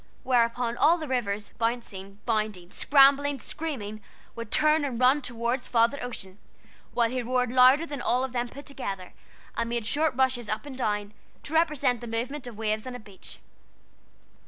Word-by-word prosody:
whereupon 235 -1 +1
all 320 +7 +4
the 315 -3 -6
rivers 210 -6 -2
bouncing, 210 -4 -3
bounding, 215 -6 -2
scrambling, 280 0 +4
screaming, 230 -10 -5 0.3
would 230 -2 -6
turn 305 +4 +3
and 255 -5 -3
run 260 +3 +4
toward 240 0 -1
Father 240 +3 +2
Ocean, 205 -6 -7 0.6
while 235 -1 +4
he 255 0 -1
roared 250 0 0
louder 255 +5 +6
than 290 -4 -6
all 250 +2 +1
of 265 - -3
them 240 0 -2
put 280 +3 -11
together, 195 -10 -6 0.4
and 230 0 -1
made 235 -2 -2
short 295 +3 +1
rushes 255 -4 +1
up 215 +6 -2
and 280 -2 -8
down, 210 -3 -1 0.3
to 300 - -7
represent 290 -7 +2
the 240 - -7
movement 245 +4 -3
of 235 -4 -9
waves 215 +1 -1
on 255 - -5
a - - -7
beach. 200 -3 -12
245 Hz, 170 wpm, -27 LUFS, 220-275 Hz, 0.6 s, louder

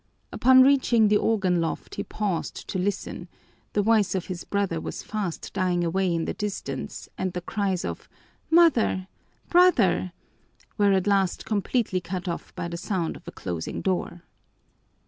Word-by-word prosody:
Upon 260 +1 +6
reaching 250 -5 +4
the 210 - +5
organ 190 -6 +1
loft 165 - -4
he - - -3
paused 200 -6 -3
to 185 - -2
listen; 200 +2 -3 0.5
the 205 - +2
voice 215 -2 +3
of 185 - -2
his 180 -2 -6
brother 195 -5 -1
was - - -6
fast 205 -6 -4
dying 180 -2 +1
away 185 +2 +1
in 165 -1 0
the - - -2
distance 190 -10 -5
and 185 -1 -1
the 180 - -3
cries 190 -1 -1
of - - -6 0.4
"Mother! 300 - +4 0.4
Brother!" 245 - +4 0.6
were 205 -2 +3
at 190 -1 +2
last 195 -3 +1
completely 210 -2 0
cut 185 +1 -5
off 170 - -4
by 170 - -3
the 170 0 -5
sound 175 -2 -2
of - - -14
a - - -5
closing 85 -3 -5
door. 180 -2 -2
190 Hz, 160 wpm, -26 LUFS, 175-210 Hz, 0.6 s, Upon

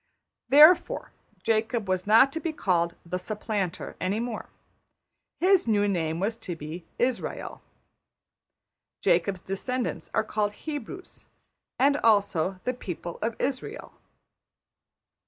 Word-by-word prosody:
Therefore 310 +5 +6 0.3
Jacob 225 -1 0
was 185 0 -1
not 230 +6 +6
to 325 - -2
be 320 +1 -2
called 170 - 0
``the 180 +2 -2
Supplanter'' 205 -2 -3
any 190 +4 0
more: 235 -2 -4 0.9
his 375 -5 +4
new 205 -2 +3
name 165 -4 -1
was 210 +4 -1
to 180 -6 -6
be 160 +2 -8
Israël. 245 0 -2 1.4
Jacob's 190 -3 +2
descendants 245 +6 -3
are - - +1
called 210 -1 -1
Hebrews, 310 - -8 0.5
and 280 +2 +4
also 200 - +2
``the 250 0 -2
people 175 -1 -6
of 225 +1 -2
Israël.'' 280 - -4
215 Hz, 115 wpm, -27 LUFS, 185-255 Hz, 1.4 s, Therefore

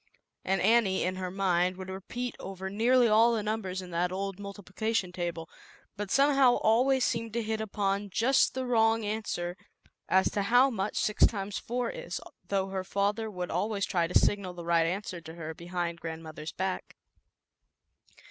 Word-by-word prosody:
" - - -57
And 195 0 0
Annie, 210 -3 +3
in 185 +1 -1
her 185 -1 -3
mind, 185 -1 +1
would 190 0 -7
repeat 240 +6 -5
over 190 0 -6
nearly 240 +4 +4
all 225 +2 +5
the 215 - -1
numbers 200 -4 -3
in 180 - -10
that 175 +1 0
old 195 +1 -4
multiplication 200 0 -3
table, 170 -2 -4 0.5
but 205 -1 -5
somehow 275 0 +5
always 255 +4 +3
seem 230 -1 -1
to 235 0 -1
hit 220 0 -2
upon 200 -1 -1
just 255 +6 +3
the 260 0 -2
wrong 225 -2 +3
answer 205 -5 -3 0.5
as 190 0 +3
to 205 - 0
how 245 +6 +4
much 205 -2 -2
six 210 - +4
times 200 -2 -4
four 245 +1 -2
is, - - -5 0.3
though 195 -1 0
her 190 -1 -3
father 205 +4 -1
would 180 -3 -5
always 205 -1 0
try 170 -4 0
to 180 - +4
signal 195 -3 +1
the 170 -1 -8
right 170 -1 +3
answer 185 -1 -4
to 160 0 -10
her 160 -1 -6
behind 170 0 -4
grandmother's 160 -1 -6
back. 190 0 -4
195 Hz, 175 wpm, -29 LUFS, 180-225 Hz, 0.5 s, all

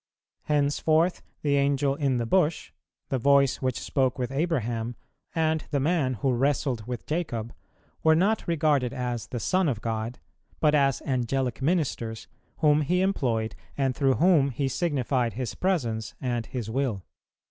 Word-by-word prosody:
Henceforth 155 +4 +2 0.2
the 140 -1 +2
Angel 140 0 +2
in 140 -3 0
the 120 - -1
bush, 165 +4 +1 0.4
the 135 - 0
voice 140 +1 +4
which 130 -2 0
spoke 130 -2 0
with 125 -1 -2
Abraham, 120 -7 -1 0.4
and 160 -1 +1
the 145 - 0
man 140 -3 +1
who 130 +4 0
wrestled 130 -3 0
with 125 -2 -5
Jacob, 120 -9 -3 0.5
were 160 0 +5
not 200 +6 +1
regarded 145 -6 +1
as 125 -3 -3
the 120 - -4
Son 185 +5 +1
of 120 -6 -2
God, 115 +2 -3 0.4
but 150 -1 +3
as 140 -3 +2
Angelic 130 -1 -1
ministers, 130 -8 -1 0.3
whom 150 -1 +4
He 180 +5 +1
employed, 120 - 0 0.2
and 135 -2 +1
through 135 -1 +2
whom 160 -5 +4
He 135 +2 -1
signified 130 -5 0
His 125 -2 -4
presence 120 - -1
and 120 -3 -2
His 120 -4 -4
will. 115 -5 -2
135 Hz, 150 wpm, -27 LUFS, 120-150 Hz, 0.5 s, were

